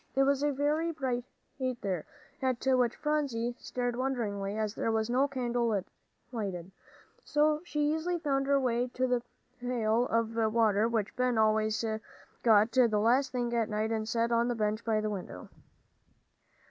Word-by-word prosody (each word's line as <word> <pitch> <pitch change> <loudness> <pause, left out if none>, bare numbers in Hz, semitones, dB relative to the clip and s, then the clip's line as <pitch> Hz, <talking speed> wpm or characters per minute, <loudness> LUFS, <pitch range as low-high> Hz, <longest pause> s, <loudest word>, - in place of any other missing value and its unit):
It 270 - +4
was 280 0 +2
very 295 +3 +1
bright 255 -6 -2 0.3
there, 235 - -2 0.4
at 260 -2 -1
which 250 -3 +3
Phronsie 275 -6 -1
stared 245 -1 -3
wonderingly, 215 -6 -2
as 215 -1 -1
there 225 - -1
was 220 +1 0
no 265 +3 +3
candle 240 -5 0 0.5
lighted, 190 -6 -4 0.5
so 300 0 +2
she 300 -3 0
easily 345 +3 -1
found 275 -4 0
her 280 0 +4
way 245 -1 +1
to 255 - +1
the 250 -1 +1 0.4
pail 240 -1 +1
of 230 0 0 0.2
water 220 -1 +3
which 225 -3 -1
Ben 250 -1 +1
always 215 0 +2 0.6
got 220 -1 +5
the 250 +1 +5
last 250 +6 +3
thing 240 -2 -2
at 230 -2 +1
night 215 +1 -1
and 220 0 -2
set 235 0 +1
on 235 0 +3
the 245 - 0
bench 215 0 -1
by 220 -2 +1
the 215 - -1
window. 195 -3 -7
240 Hz, 160 wpm, -30 LUFS, 220-265 Hz, 0.6 s, got